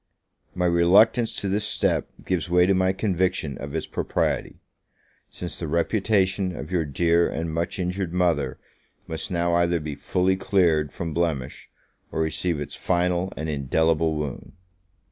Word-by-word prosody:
My 90 -1 0
reluctance 95 +7 +4
to 100 - -3
this 100 +2 0
step 105 - +1 0.2
gives 90 -2 -1
way 90 0 +5
to 95 - +3
my 95 0 +2
conviction 95 -7 -1
of 70 +2 -6
its 80 - -2
propriety, - - -2 0.7
since 90 - -6
the 85 - -4
reputation 95 +2 +1
of 75 +5 -7
your 85 -3 +1
dear 85 +4 +2
and 80 0 -3
much 85 +2 -2
injured 90 -1 -2
mother 85 -7 +1 0.5
must 80 +6 -5
now 85 -1 0
either 85 0 +2
be 75 -1 -5
fully 90 +6 0
cleared 85 -7 +2
from 85 -2 -5
blemish, 80 -7 -2 0.4
or - - -3
receive 80 +1 -1
its 75 - -6
final 90 +1 0
and 80 - -3
indelible 80 +2 +1
wound. 75 -4 -5
85 Hz, 150 wpm, -24 LUFS, 80-95 Hz, 0.7 s, way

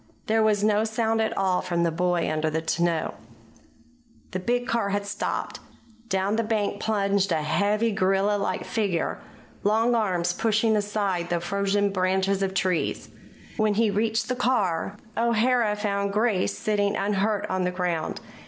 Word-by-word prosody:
There 220 +1 +2
was 210 -2 +2
no 210 0 +3
sound 225 0 0
at 220 - -1
all 190 -2 +1
from 170 -1 -1
the 170 - +1
boy 175 +1 0
under 155 0 0
the 160 +1 -1
tonneau. 165 0 0 1.2
The 185 - -2
big 245 +6 0
car 230 -5 0
had 200 0 -1
stopped. 205 +1 -3 0.5
Down 195 +2 0
the 230 - +1
bank 210 -2 -1
plunged 200 -2 +1
a 160 -2 +1
heavy, 205 +8 +1
gorilla 195 +1 +2
like 200 - -2
figure, 200 -7 -1 0.4
long 225 +4 +2
arms 180 -6 +1
pushing 220 +2 +2
aside 200 -4 -1
the 175 -1 0
frozen 200 +3 0
branches 190 +1 +1
of 190 -1 -1
trees. 180 -2 -1 0.5
When 215 -2 +2
he 220 0 +2
reached 220 +2 0
the 255 - -1
car, 210 -7 0 0.2
O'Hara 235 -1 +2
found 200 -1 -1
Grace 210 -3 +1
sitting 205 -1 0
unhurt 205 +1 0
on 185 0 -1
the 180 - +1
ground. 180 -3 -2
200 Hz, 155 wpm, -25 LUFS, 185-220 Hz, 1.2 s, no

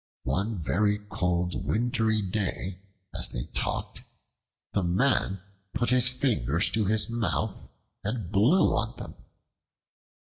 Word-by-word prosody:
One 105 +3 -1
very 105 +6 +1
cold 90 0 -1
wintry 110 -2 +1
day, 95 -1 -3 0.3
as - - +2
they - - -2
talked, - - -2 0.7
the 100 - +1
Man 95 +1 +1 0.3
put 120 -1 +1
his 125 -1 +6
fingers 115 - +2
to 110 -2 +1
his 110 +2 +2
mouth 115 -2 -2 0.3
and 105 -3 -4
blew 125 - +4
on - - -2
them. - - -8
105 Hz, 115 wpm, -27 LUFS, 95-120 Hz, 0.7 s, his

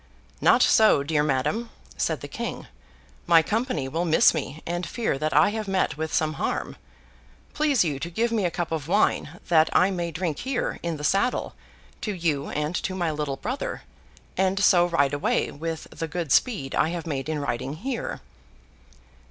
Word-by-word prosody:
'Not - - +5
so, 215 -10 +5
dear 150 0 +1
madam,' 150 - 0 0.3
said - - -1
the - - -6
King. - - -5 0.6
'My 165 -1 +6
company 215 - -1
will 165 +6 -2
miss 160 -2 +5
me, 155 -1 -5
and 175 +1 -2
fear 215 - -2
that 155 +1 -1
I 150 +6 +5
have 215 0 -4
met 190 -5 0
with 160 +1 -4
some 155 -1 +1
harm. - - -2 0.8
Please 295 -7 +3
you 145 -5 -2
to 165 - -4
give 230 +7 0
me 220 -3 +1
a 175 - +2
cup 170 0 -4
of 155 -3 -3
wine, 175 -3 +1
that 160 -2 +5
I 185 +2 +4
may 175 -2 -2
drink 165 -2 -3
here, 260 -1 -2
in 170 -2 -3
the 150 - -8
saddle, 200 +10 +1 0.5
to 210 - -2
you 155 -5 -1
and 150 +2 -2
to 185 - -3
my 175 -3 0
little 150 -3 -3
brother, 250 - -4 0.5
and 190 +1 +1
so 175 -2 +5
ride 145 -5 +1
away 145 - 0
with 160 +2 -5
the 165 - -4
good 165 -2 -4
speed 155 - +2
I 160 - +2
have 170 0 -4
made 145 -2 -3
in 155 - -1
riding 135 -1 -3
here. 240 - -4
165 Hz, 185 wpm, -25 LUFS, 150-190 Hz, 0.8 s, My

